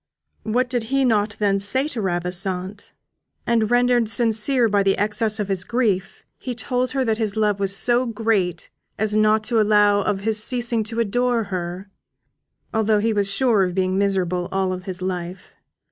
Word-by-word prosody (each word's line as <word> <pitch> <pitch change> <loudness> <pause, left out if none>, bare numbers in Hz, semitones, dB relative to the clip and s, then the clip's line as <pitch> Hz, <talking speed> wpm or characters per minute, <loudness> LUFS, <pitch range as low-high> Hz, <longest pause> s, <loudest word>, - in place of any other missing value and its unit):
What 245 +4 0
did 245 -3 -2
he 270 +3 +1
not 210 -3 +1
then 200 -2 +1
say 260 +8 0
to 245 -7 -3
Ravissante? 185 +2 -3 0.5
And 225 -2 +1
rendered 245 -2 +2
sincere 230 +3 +3
by 205 -2 +2
the 195 0 +1
excess 215 +1 -1
of 205 - -2
his 190 -2 -1
grief, 205 -3 -1 0.2
he 250 -2 -5
told 250 +1 -1
her 265 -2 -1
that 220 -1 0
his 215 -2 -1
love 210 -2 +1
was 195 0 +1
so 245 +3 +2
great 210 -6 -1 0.3
as 215 0 +1
not 215 0 +3
to 225 0 +1
allow 205 -1 +3
of 195 -1 -2
his 215 0 +1
ceasing 240 -2 0
to 225 +2 -4
adore 240 +1 0
her, 180 +2 -5 0.8
although 220 -1 +2
he 220 +2 0
was 200 -1 0
sure 215 +1 +2
of 180 -1 -2
being 185 -1 0
miserable 185 -2 0
all 190 -1 -1
his 185 0 -7
life. 180 0 -5
210 Hz, 175 wpm, -21 LUFS, 195-230 Hz, 0.8 s, sincere